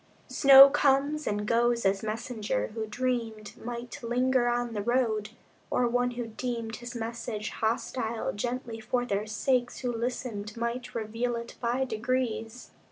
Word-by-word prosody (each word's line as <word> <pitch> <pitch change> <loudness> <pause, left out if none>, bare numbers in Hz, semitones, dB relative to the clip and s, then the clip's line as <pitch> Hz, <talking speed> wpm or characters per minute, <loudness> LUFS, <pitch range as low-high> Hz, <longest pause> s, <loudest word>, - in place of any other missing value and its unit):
Snow 275 -1 +9
comes 285 +1 +2
and 210 0 -1
goes 235 0 +2
as 195 0 +2
messenger 215 - -2
who 220 -1 -3
dreamed 225 -2 -3
Might 240 +1 -7
linger 250 +1 +2
on 240 -1 0
the 210 - -2
road; 220 -2 +1 0.4
or 245 - +2
one 245 +1 +1
who 240 - -2
deemed 230 0 -4
His 240 0 -8
message 230 -2 -4
hostile 230 0 -2
gently 240 +1 -4
for 245 +2 -1
their 205 -1 -1
sakes 245 +3 0
Who 245 -2 -2
listened 230 -3 -4
might 235 +1 -3
reveal 230 +2 -2
it 235 0 -6
by 245 +2 +1
degrees. 240 0 -2
235 Hz, 145 wpm, -28 LUFS, 220-250 Hz, 0.4 s, Snow